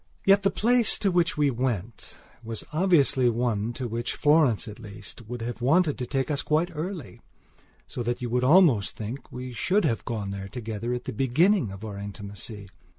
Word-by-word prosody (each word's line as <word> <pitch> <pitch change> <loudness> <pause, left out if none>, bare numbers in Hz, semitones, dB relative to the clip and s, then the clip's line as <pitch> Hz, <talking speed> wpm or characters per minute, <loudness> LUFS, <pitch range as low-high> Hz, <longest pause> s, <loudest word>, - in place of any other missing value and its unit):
Yet 195 +1 +6
the 195 - +3
place 240 +2 +2
to 200 - +1
which 175 -2 +1
we 145 -2 +3
went 120 -4 -3 0.3
was 115 -1 -3
obviously 155 -7 +3
one 115 -2 0
to 125 0 -4
which 115 +1 -3
Florence 145 -7 +3
at 105 0 -9
least 110 +1 -10
would 120 -1 -5
have 120 0 -5
wanted 150 +4 +3
to 125 - -3
take 135 +2 -1
us 140 - +1
quite 160 +4 +1
early, 155 - -6 0.6
so - - -6
that 120 +1 -2
you 125 - -3
would 125 +1 0
almost 140 - +5
think 115 +6 -7
we 125 0 -6
should 195 - +1
have 115 - 0
gone 105 -4 -4
there 100 0 -5
together 115 +1 -4
at 125 - -6
the - - -4
beginning 145 - +2
of 100 +3 -8
our 100 -2 -6
intimacy. 100 0 -7
125 Hz, 190 wpm, -26 LUFS, 110-155 Hz, 0.6 s, Yet